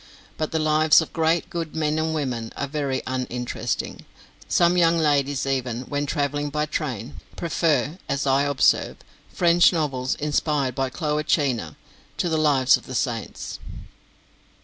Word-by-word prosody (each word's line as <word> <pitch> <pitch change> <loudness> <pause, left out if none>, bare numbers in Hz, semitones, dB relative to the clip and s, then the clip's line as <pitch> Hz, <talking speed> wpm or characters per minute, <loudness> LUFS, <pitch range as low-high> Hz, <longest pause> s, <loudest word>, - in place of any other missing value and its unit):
But 155 - -3
the 160 - 0
lives 155 0 +5
of 160 - -4
great 165 +1 +2
and - - -26
good 165 -3 -4
men 155 -1 0
and 160 0 0
women 125 -6 -3
are - - -1
very 140 -2 -2
uninteresting; 125 -1 -3 0.4
some 175 +1 +3
young 170 -1 +4
ladies 145 -3 +1
even, 130 -3 -1
when 145 +2 -3
travelling 145 0 -1
by 150 +1 -1
train, 135 -5 -4 0.2
prefer, 160 -2 0
as 140 0 -1
I 135 0 +3
observe, 145 -2 +2 0.3
French 175 0 +5
novels 135 -7 -1
inspired 145 -2 0
by 135 +1 -1
Cloacina 145 - -1 0.4
to 175 - 0
the 160 - +1
"Lives 140 -4 +4
of - - -16
the 130 - -6
Saints." 120 -4 -3
145 Hz, 150 wpm, -24 LUFS, 130-155 Hz, 0.4 s, lives